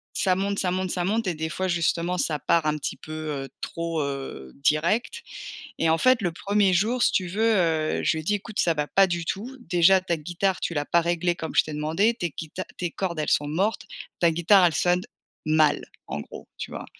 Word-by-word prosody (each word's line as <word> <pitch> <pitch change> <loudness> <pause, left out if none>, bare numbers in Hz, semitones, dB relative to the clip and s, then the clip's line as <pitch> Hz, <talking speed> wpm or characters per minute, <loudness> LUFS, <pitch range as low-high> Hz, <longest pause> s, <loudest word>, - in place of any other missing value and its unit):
ça 185 -2 +2
monte 200 +1 -1
ça 185 -2 0
monte 185 0 -1
ça 180 0 -1
monte 215 +2 0
et 175 - -1
des 160 +1 -3
fois 185 +4 -2
justement 170 0 0
ça 155 -4 0
part 170 +2 +2
un 150 0 +1
petit 145 - -4
peu, 155 - -11 0.3
heu, - - -12
trop, 165 -1 -3
heu, 135 - -5
direct 170 - +1 0.6
et 165 - +2
en 160 - +3
fait 255 +5 +4
le 175 -3 0
1er 200 +3 +1
jour 220 +7 +1
si - - +4
tu 185 - 0
veux, 195 +5 -3 0.2
heu, 160 -3 +1
je - - +3
lui 160 - -1
ai - - -6
dis: 205 +6 +1
«Écoute 205 +1 -6
ça 170 - +3
va 150 -1 0
pas 195 +4 +4
du 175 -2 -2
tout, 240 +10 -4
déjà 185 -2 +4
ta 175 -2 -1
guitare 175 +5 -1
tu 170 - -3
l'as 145 0 0
pas 170 - +3
réglée 175 +1 0
comme 160 -1 -6
je - - +6
t'ai 155 - -7
demandé. 160 +9 +1
Tu 175 - 0
es - - -8
guita 160 +4 -6
tes 175 -2 -3
cordes 180 -4 -3
elles 150 - -1
sont 145 - +2
mortes, 190 +9 -1 0.3
ta 170 - +4
guitare 175 +3 +5
elle 165 - -2
sonne 180 0 +2 0.4
mal». 155 -1 +3 0.2
En 70 +2 -4
gros, - - -11
tu - - -6
vois? - - -6
175 Hz, 235 wpm, -25 LUFS, 160-190 Hz, 0.6 s, je